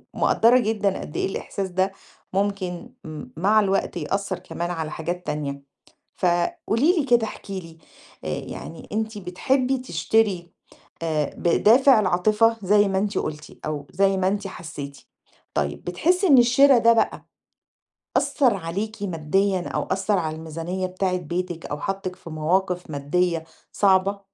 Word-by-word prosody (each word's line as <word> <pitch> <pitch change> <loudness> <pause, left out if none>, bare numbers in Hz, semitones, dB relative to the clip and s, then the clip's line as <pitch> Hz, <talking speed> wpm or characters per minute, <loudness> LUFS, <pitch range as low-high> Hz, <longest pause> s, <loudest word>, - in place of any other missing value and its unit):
ومقدّرة 240 +3 +4
جدًا 210 -4 0
قد - - -7
إيه - - +1
الإحساس 195 0 -4
ده 190 +2 0 0.4
ممكن 195 -3 -2 0.2
م 155 -1 -7
مع 205 +5 +4
الوقت 195 -1 0
يأثّر 200 -2 -2
كمان 175 +1 -4
على 160 -2 -3
حاجات 175 +2 -4
تانية. 140 -2 -3 0.5
فقولي 250 - +1
لي - - +2
كده 240 -3 +4
احكي 195 -2 -6
لي، 165 -1 -13 0.7
يعني 165 - -8
أنتِ 220 0 -2
بتحبّي 255 +8 0
تشتري 190 -4 0 0.5
آآ 155 -3 -1
بدافِع 235 +8 +5
العاطفة 215 +4 +3
زي 205 +1 +4
ما 190 - 0
أنتِ 205 +1 -1
قُلتِ 150 -1 -6
أو 145 -2 -4
زي 195 0 +2
ما 185 0 +1
أنتِ 200 0 -2
حسّيتِ، 150 -6 -8 0.5
طيب 70 0 -2
بتحسّي 360 - +1
إن 275 -4 +7
الشِرا 250 +2 +6
ده 230 0 +6
بقى 225 - 0 0.9
أثّر 255 -7 +3
عليكِ 195 +5 -4
مادّيًا 185 +2 +1
أو - - -2
أثّر 195 +1 +1
على 155 -2 -2
الميزانية 165 +4 -4
بتاعة 185 0 -1
بيتِك 175 0 -4
أو 145 - -4
حاطِّك 195 -2 -3
في 165 - -11
مواقِف 180 +3 0
مادّية 165 +4 0 0.3
صعبة؟ 195 0 +3
190 Hz, 140 wpm, -24 LUFS, 165-215 Hz, 0.9 s, إن